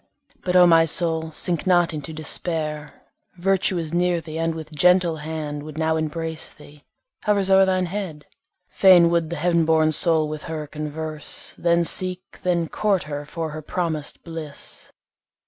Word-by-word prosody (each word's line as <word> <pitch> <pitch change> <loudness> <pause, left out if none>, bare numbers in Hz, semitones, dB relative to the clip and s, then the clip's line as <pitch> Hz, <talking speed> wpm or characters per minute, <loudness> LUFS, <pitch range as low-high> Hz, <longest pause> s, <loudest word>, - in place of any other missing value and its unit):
But, 180 0 -2
O 180 -1 +8
my 165 -1 +6
soul, 160 0 +1
sink 170 +3 -1
not 175 -2 +3
into 155 +1 -6
despair, 155 -1 -3 0.3
Virtue 190 +1 +1
is 165 -1 -4
near 175 0 +1
thee, 160 -1 -7
and 165 0 -1
with 160 -1 -9
gentle 180 +1 +3
hand 150 -1 -5
Would 155 0 -10
now 160 0 +1
embrace 160 +1 -3
thee, 145 0 -17 0.4
hovers 200 -2 +1
o'er 190 0 +6
thine 185 -1 +1
head. 175 -5 -6 0.4
Fain 175 -3 +5
would 170 -2 0
the 170 - -4
heav'n 170 +1 +1
born 160 -1 +3
soul 160 -1 +4
with 150 0 -6
her 155 -2 -5
converse, 155 0 -6
Then 170 0 +2
seek, 185 +2 +2
then 175 -2 0
court 200 +1 0
her 145 -1 -6
for 160 +1 -5
her 155 +1 -7
promis'd 160 -2 -3
bliss. 160 -4 -8
165 Hz, 165 wpm, -22 LUFS, 155-175 Hz, 0.4 s, O